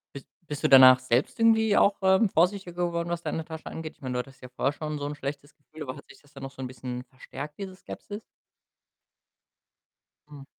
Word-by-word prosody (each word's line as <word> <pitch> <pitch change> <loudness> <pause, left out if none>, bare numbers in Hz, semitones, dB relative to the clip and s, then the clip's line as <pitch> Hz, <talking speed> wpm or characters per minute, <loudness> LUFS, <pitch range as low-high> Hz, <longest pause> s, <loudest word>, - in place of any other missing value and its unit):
Bist 140 - -9 0.2
bist 150 -1 -6
du - - +3
danach 130 -1 +9
selbst 130 - 0
irgendwie 220 -2 +4
auch, 200 - +4
ähm, 190 +3 +4
vorsichtiger 180 +1 +1
geworden, 170 0 -3
was 170 -1 -2
deine 160 - -3
Tasche 160 0 -9
angeht? 160 -1 -6
Ich - - -37
meine, 130 -2 -4
du 125 - -1
hattest 135 +2 -8
ja - - -7
vorher 130 +2 -1
schon 150 0 -5
so 145 - -4
'n 145 - -4
schlechtes 145 +1 -6
Gefühl, 155 +1 -15
aber 130 +2 -6
hat 145 - -14
sich - - -17
das 145 - -25
dann 135 - -10
noch 135 - -6
so 135 - -11
'n 130 - -3
bisschen, 125 0 -6
verstärkt, 145 +3 -9
diese 190 -2 -6
Skepsis? 205 +2 -9 2.1
Hm. 145 -2 -11
145 Hz, 215 wpm, -27 LUFS, 130-175 Hz, 2.1 s, danach